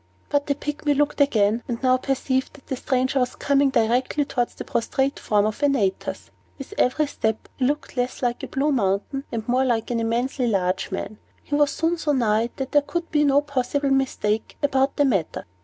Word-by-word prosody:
But 285 0 +1
the 280 - +1
Pygmy 295 0 -1
looked 295 0 +1
again, 220 -4 +3
and 240 - -2
now 255 0 +5
perceived 265 0 -1
that 275 - -17
the 265 - -3
stranger 260 +1 0
was 250 -1 0
coming 280 0 +2
directly 255 +4 +1
towards 245 -3 -2
the - - -6
prostrate 265 +2 -1
form 210 -1 +2
of 215 +6 -3
Antaeus. 265 -10 0 0.3
With 275 +8 -9
every 280 +5 +2
step, 220 -6 -2
he 255 - +1
looked 290 +2 -2
less 250 +1 -2
like 240 -1 0
a - - -5
blue 285 +3 0
mountain, 225 +3 0
and 225 -2 -4
more 255 +2 +2
like 235 -3 0
an 235 - 0
immensely 240 +3 0
large 185 -4 0
man. 205 +2 -5 0.2
He - - -8
was 290 0 +4
soon 330 +3 -1
so 300 -2 +1
nigh, 230 -3 +2
that 265 -1 -4
there 290 - +5
could 335 +3 -4
be 295 -1 +3
no 285 0 +4
possible 280 0 -1
mistake 225 -5 0
about 270 -1 +2
the 290 - +3
matter. 195 - -1
260 Hz, 200 wpm, -23 LUFS, 230-285 Hz, 0.3 s, now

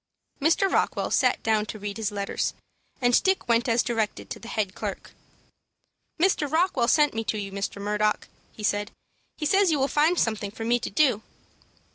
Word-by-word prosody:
Mr. 330 +6 +3
Rockwell - - 0
sat - - +2
down 215 -1 +1
to 215 - -6
read 205 0 -5
his 220 -2 -2
letters, 200 -1 -2 0.5
and 245 0 +4
Dick 380 -6 +1
went 235 +1 +2
as 230 +1 +3
directed 225 -3 -2
to - - -5
the 230 - -11
head 210 -5 -2
clerk. - - -6 1.1
"Mr. 320 -5 +2
Rockwell 320 -7 +2
sent 295 +2 +4
me 225 0 -2
to 215 - -1
you, 200 -1 -5
Mr. 200 +1 -4
Murdock," 210 +1 0 0.2
he 215 - -11
said. 205 0 0 0.5
"He 305 - -3
says 390 +3 +4
you 310 - +2
will 270 0 +1
find 310 +5 +2
something 220 -5 0
for 225 +2 -7
me 240 +1 +2
to - - -4
do." 250 -3 +2
230 Hz, 185 wpm, -26 LUFS, 210-295 Hz, 1.1 s, and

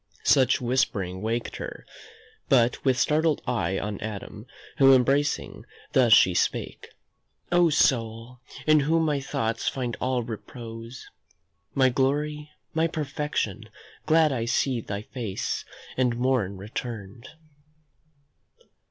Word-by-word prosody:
Such 130 -2 +4
whispering 100 -7 -1
waked 115 +2 -2
her, - - -7 0.6
but 120 -2 +3
with 130 -2 +2
startled 155 +3 +2
eye 95 -7 -1
On 105 0 -4
Adam, 105 +1 -7 0.3
whom 135 -1 +8
embracing, 140 +3 0 0.3
thus 125 -3 +4
she 95 -3 +7
spake: - - -2 0.6
"O 175 -1 +5
soul! 120 -4 +1 0.3
in 155 0 +5
whom 160 +3 +2
my 150 -2 +1
thoughts 115 -4 -2
find 125 -3 -3
all 130 -1 0
repose, 115 +1 -8 0.7
My 130 -1 +4
glory, 150 +4 -1 0.2
my 160 +1 +2
perfection, 140 - -3 0.4
glad 160 -1 +4
I 120 -4 -1
see 120 +1 0
Thy 100 -1 -5
face, 110 -5 -4 0.3
and 125 -2 +1
morn 120 -6 0
returned." 110 +1 -7
125 Hz, 115 wpm, -26 LUFS, 115-140 Hz, 0.7 s, whom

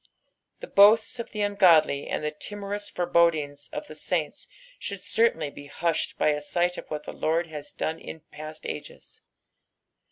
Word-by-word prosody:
The - - -5
boasts 215 +4 +5
of 235 - -5
the 210 - -4
ungodly 175 -8 +4
and - - -2
the 150 - -1
timorous 205 +5 -4
forebodings 165 -6 +1
of 150 - -5
the - - -10
saints 155 0 -2 0.3
should 200 -1 -5
certwnly 165 -10 +1
be 145 0 -11
hushed 165 +3 -1
by - - +3
a 150 0 0
sight 175 +4 0
of - - -10
what 150 -1 -4
the - - -7
Lord 165 +2 0
has 150 -3 -7
done 160 +1 -3
in 160 - -9
past 155 +1 -9
ages. - - -8
165 Hz, 165 wpm, -26 LUFS, 150-200 Hz, 0.3 s, boasts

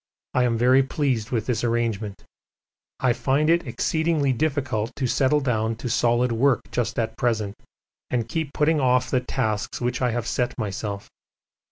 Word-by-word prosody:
I 125 - +3
am 115 -2 +1
very 125 +3 +5
pleased 130 -4 -1
with 115 -4 -1
this 120 -2 -1
arrangement. 115 -4 -1 0.8
I 125 -2 +3
find 145 +5 +2
it 170 +1 +2
exceedingly 160 -4 +1
difficult 130 -6 -1
to 135 - -2
settle 135 +4 +2
down 115 -4 0
to 120 +1 -4
solid 120 +1 +2
work 125 +3 +3
just 120 -2 -1
at 115 -1 -1
present 110 -4 0 0.6
and 120 -3 -1
keep 160 +1 -3
putting 150 +1 +2
off 125 -1 +2
the 130 - +3
tasks 105 -4 -2
which 120 0 -2
I 125 - +2
have 120 0 -2
set 125 +1 -1
myself. 105 -2 -4
125 Hz, 165 wpm, -24 LUFS, 115-135 Hz, 0.8 s, very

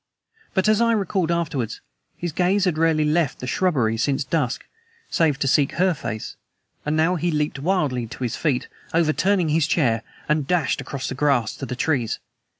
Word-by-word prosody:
But, 190 +1 +2
as 215 +1 +4
I 230 0 +4
recalled 195 -5 0
afterwards, 145 -9 -1 0.4
his 175 -1 -3
gaze 185 +4 +2
had 180 -4 +1
rarely 160 -2 +3
left 155 -1 +1
the - - -5
shrubbery 125 -7 +1
since 135 +5 +1
dusk, 145 -5 -1 0.5
save 160 -5 +2
to 140 - -1
seek 135 +1 +3
her 185 +2 +2
face, 110 -7 -5 0.5
and 150 +1 0
now 170 +3 +3
he 175 +2 0
leaped 150 -2 -1
wildly 140 -8 0
to 125 - -7
his 120 - -1
feet, 140 -6 0 0.3
overturning 170 +2 +2
his 155 0 +2
chair, 120 -10 +2 0.3
and 150 -2 +1
dashed 175 -5 +1
across 140 -2 -5
the - - -3
grass 130 -4 +1
to 135 - -5
the 125 - -4
trees. 125 -4 0
155 Hz, 180 wpm, -23 LUFS, 135-175 Hz, 0.5 s, as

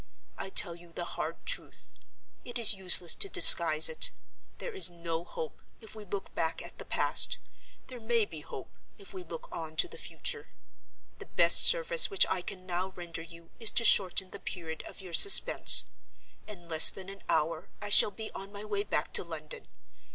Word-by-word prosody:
I - - -8
tell 190 -2 0
you 170 0 -17
the 175 +1 -8
hard - - -8
truth—it 260 - -8
is 230 -2 +3
useless 180 -3 +2
to 395 - -5
disguise - - +6
it. 485 0 +1 0.5
There 485 - -9
is 390 - +3
no 170 -1 -7
hope, 475 - -10 0.2
if 220 - -14
we 215 -1 -11
look 200 +1 -8
back 165 0 -4
at - - -15
the - - -10
past: - - +1 0.5
there 250 -2 -12
may 230 -1 -2
be 160 -5 -12
hope, 135 - -12 0.2
if 200 -1 -14
we 190 - -8
look 165 -1 -11
on 160 -1 -9
to - - +1
the 465 - -14
future. 460 -2 -5 0.7
The - - -13
best - - +5
service - - +3
which 395 -3 +2
I 185 - -3
can 185 +1 -9
now 185 +1 -5
render 170 -2 -9
you 165 0 -16
is 225 -2 +3
to 235 - +3
shorten 190 -3 +2
the - - -11
period 160 -3 -9
of - - -14
your 185 -3 -13
suspense. 400 - +5 0.6
In 185 -5 -13
less 160 -1 +6
than 190 -1 -9
an 195 0 -13
hour 160 +1 -3
I 205 - -8
shall 205 - +7
be 220 +1 -10
on 195 +1 -11
my 205 +1 -11
way 205 -1 -4
back 200 -7 -5
to - - +1
London. 160 -3 -12
190 Hz, 190 wpm, -27 LUFS, 170-220 Hz, 0.7 s, shall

